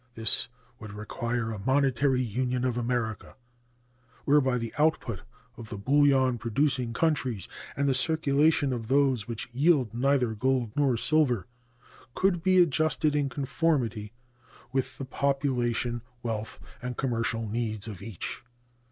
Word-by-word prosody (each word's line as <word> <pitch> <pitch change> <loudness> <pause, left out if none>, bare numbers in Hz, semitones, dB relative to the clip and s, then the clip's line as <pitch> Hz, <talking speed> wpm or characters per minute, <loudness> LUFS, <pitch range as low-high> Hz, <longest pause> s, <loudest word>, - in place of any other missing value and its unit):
This 110 -1 0 0.3
would 110 -2 -9
require 115 +2 -3
a 110 - -5
monetary 130 +2 +2
union 125 +2 -1
of 125 -2 0
America, 120 -2 -2 0.9
whereby 135 -3 +3
the 115 -2 -4
output 150 - +1 0.4
of 115 -2 -9
the 105 - -5
bullion 135 +1 +3
producing 125 +1 0
countries 130 - 0 0.3
and 140 0 +1
the 135 - +3
circulation 145 0 +2
of 115 -3 -4
those 130 -5 +2
which 115 -2 -5
yield 135 -3 +2
neither 125 -1 +1
gold 125 0 0
nor 140 -5 +2
silver 130 - +2 0.7
could 185 -3 +2
be 185 +1 +3
adjusted 155 -2 +2
in 145 -2 +1
conformity 130 -6 -1 0.6
with 130 -1 -2
the 135 - -5
population, 125 -4 -1 0.2
wealth, 110 -2 -3 0.2
and 125 -1 -5
commercial 115 -3 -1
needs 110 -1 -3
of 105 -5 -7
each. 100 -4 -6
125 Hz, 130 wpm, -28 LUFS, 115-140 Hz, 0.9 s, whereby